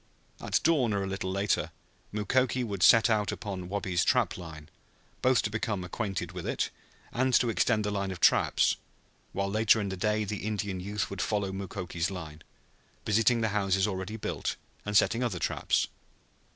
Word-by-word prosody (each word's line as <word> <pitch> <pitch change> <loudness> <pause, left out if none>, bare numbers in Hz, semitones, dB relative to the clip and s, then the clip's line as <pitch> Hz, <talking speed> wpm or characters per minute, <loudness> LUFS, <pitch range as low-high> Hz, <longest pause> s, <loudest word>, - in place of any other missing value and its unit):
At - - +1
dawn 140 -9 +3
or 100 -1 0
a - - -3
little 95 -1 -3
later 100 +1 0 0.4
Mukoki 125 +4 +1
would 100 -5 -4
set 110 +4 +7
out 105 -3 +1
upon 95 -2 -5
Wabi's 95 -3 0
trap - - +2
line, 80 -4 -9 0.5
both 130 -3 +3
to 105 - -2
become 110 -3 -2
acquainted 90 -2 -3
with 90 -2 -6
it - - -1 0.4
and 130 +1 +1
to 120 -2 +3
extend 105 +2 +2
the 105 - -1
line 100 -1 -1
of 95 -2 -6
traps, - - +4 0.5
while 100 +1 -1
later 110 +1 +4
in 100 -2 -2
the 95 - -3
day 105 +3 0
the 105 0 -3
Indian 100 -2 -3
youth 100 +3 -3
would 100 -2 -3
follow 100 -3 -1
Mukoki's 95 -3 -3
line, 80 -5 -7 0.6
visiting 115 +3 +3
the 110 - +1
houses 100 -2 +1
already 95 +1 -3
built - - -3 0.3
and 105 0 +3
setting 115 +4 +3
other 110 -7 -1
traps. - - 0
100 Hz, 175 wpm, -29 LUFS, 95-110 Hz, 0.6 s, set